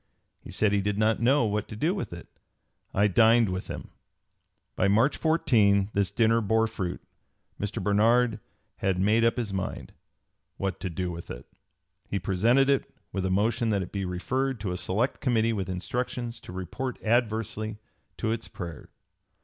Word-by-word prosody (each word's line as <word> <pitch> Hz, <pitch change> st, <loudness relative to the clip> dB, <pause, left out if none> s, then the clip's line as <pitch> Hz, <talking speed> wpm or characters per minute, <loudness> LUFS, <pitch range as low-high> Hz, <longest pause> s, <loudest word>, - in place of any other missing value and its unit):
He -, -, -13 dB
said 105 Hz, -2 st, +2 dB
he 100 Hz, -1 st, +2 dB
did 100 Hz, +1 st, -1 dB
not 110 Hz, +1 st, +2 dB
know 130 Hz, +2 st, +4 dB
what 105 Hz, -1 st, -1 dB
to -, -, -8 dB
do 155 Hz, -, +1 dB
with 195 Hz, -, -4 dB
it. 85 Hz, 0 st, -9 dB, 0.6 s
I 100 Hz, -, +3 dB
dined 115 Hz, +2 st, +5 dB
with 95 Hz, 0 st, -4 dB
him." -, -, -7 dB, 0.9 s
By 95 Hz, -, +2 dB
March 115 Hz, +8 st, +3 dB
14 105 Hz, -11 st, +3 dB
this 100 Hz, -1 st, +1 dB
dinner 115 Hz, 0 st, +3 dB
bore 110 Hz, +2 st, +2 dB
fruit. 95 Hz, -5 st, -4 dB, 0.6 s
Mr. 105 Hz, 0 st, -3 dB
Barnard 110 Hz, +2 st, +3 dB, 0.4 s
had 95 Hz, -2 st, 0 dB
made 105 Hz, +4 st, +3 dB
up 115 Hz, +1 st, +3 dB
his 110 Hz, -5 st, -2 dB
mind 95 Hz, -1 st, -4 dB, 0.6 s
"what 95 Hz, -2 st, -2 dB
to 95 Hz, -, -3 dB
do 90 Hz, +1 st, -3 dB
with 85 Hz, 0 st, -8 dB
it." -, -, -7 dB, 0.6 s
He 100 Hz, -, -1 dB
presented 110 Hz, +9 st, +3 dB
it, 140 Hz, -1 st, +1 dB, 0.2 s
with 95 Hz, -1 st, -1 dB
a -, -, -1 dB
motion 110 Hz, +4 st, +1 dB
that 100 Hz, -3 st, +1 dB
it 90 Hz, -, -9 dB
be 100 Hz, -1 st, -3 dB
referred 130 Hz, +8 st, -1 dB
to 95 Hz, -3 st, -2 dB
a -, -, -2 dB
select 105 Hz, +8 st, -1 dB
committee 115 Hz, -3 st, +2 dB
with 95 Hz, -3 st, -3 dB
instructions 120 Hz, +5 st, -3 dB
to -, -, -11 dB
report 95 Hz, +8 st, -4 dB
adversely 110 Hz, -2 st, 0 dB, 0.4 s
to 110 Hz, -, -1 dB
its 115 Hz, 0 st, -3 dB
prayer. 85 Hz, -6 st, -8 dB
105 Hz, 175 wpm, -27 LUFS, 95-115 Hz, 0.9 s, dined